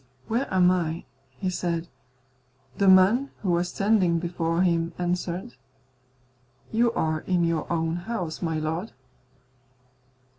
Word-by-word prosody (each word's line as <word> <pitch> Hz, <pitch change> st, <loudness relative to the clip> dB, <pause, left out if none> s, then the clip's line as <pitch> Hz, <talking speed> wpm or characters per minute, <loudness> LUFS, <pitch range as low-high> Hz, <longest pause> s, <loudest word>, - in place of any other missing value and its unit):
"Where 240 Hz, +5 st, -1 dB
am 180 Hz, -1 st, +5 dB
I?" 170 Hz, -2 st, -1 dB, 0.3 s
he 185 Hz, +4 st, -2 dB
said. 170 Hz, -2 st, -2 dB, 0.9 s
The 200 Hz, -, +3 dB
man 195 Hz, +9 st, +5 dB
who 185 Hz, -, +1 dB
was 175 Hz, +1 st, +1 dB
standing 195 Hz, -5 st, +2 dB
before 170 Hz, 0 st, -1 dB
him 170 Hz, -2 st, +1 dB
answered, 180 Hz, +5 st, -2 dB, 1.2 s
"You 235 Hz, +1 st, +3 dB
are 155 Hz, -8 st, 0 dB
in 180 Hz, -2 st, +2 dB
your 165 Hz, -1 st, -1 dB
own 165 Hz, 0 st, 0 dB
house, 175 Hz, -3 st, -4 dB
my 165 Hz, -3 st, -1 dB
lord." 160 Hz, +7 st, -3 dB
175 Hz, 120 wpm, -26 LUFS, 165-190 Hz, 1.2 s, am